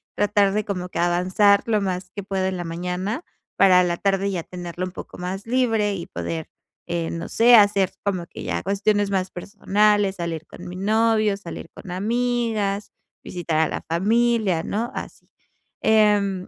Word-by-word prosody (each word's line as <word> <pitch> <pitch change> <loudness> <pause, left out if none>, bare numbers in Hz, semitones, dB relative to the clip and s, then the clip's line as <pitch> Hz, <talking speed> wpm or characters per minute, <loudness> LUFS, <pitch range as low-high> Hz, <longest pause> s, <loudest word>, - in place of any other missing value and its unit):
tratar 205 -1 +2
de 210 +1 0
como 180 -3 -3
que - - -5
avanzar 185 +4 +3
lo 215 -3 +2
más 180 -1 -3
que 200 - -6
puedo 190 -1 -2
en 190 0 -1
la 175 - -4
mañana, 180 - -3 0.3
para 185 -2 +6
en 180 - +1
la 170 - 0
tarde 195 +1 +1
ya 170 -3 -3
tenerlo 175 0 -6
un 185 - -7
poco - - -10
más 185 +3 -5
libre 225 -5 +1
y 170 - -6
poder, 160 -1 -5 0.4
eh, 170 -1 -2
no 165 - -5
sé, 240 +2 +6
hacer 200 -3 +5
como 185 -4 -1
que - - -10
ya - - -2
cuestiones 200 +1 +1
más 190 -1 -1
personales, 205 +1 +1
salir 170 -2 -4
con 180 - -11
mi 180 - -7
novio, 215 +1 +2
salir 170 -3 -8
con - - -11
amigas, 220 -1 -1 0.3
visitar 170 -3 -3
a 160 - +3
la - - -4
familia, 210 0 +2
¿no?, 225 +6 -2
así. - - -8 0.5
Em, 205 -3 +3
195 Hz, 175 wpm, -23 LUFS, 180-210 Hz, 0.5 s, para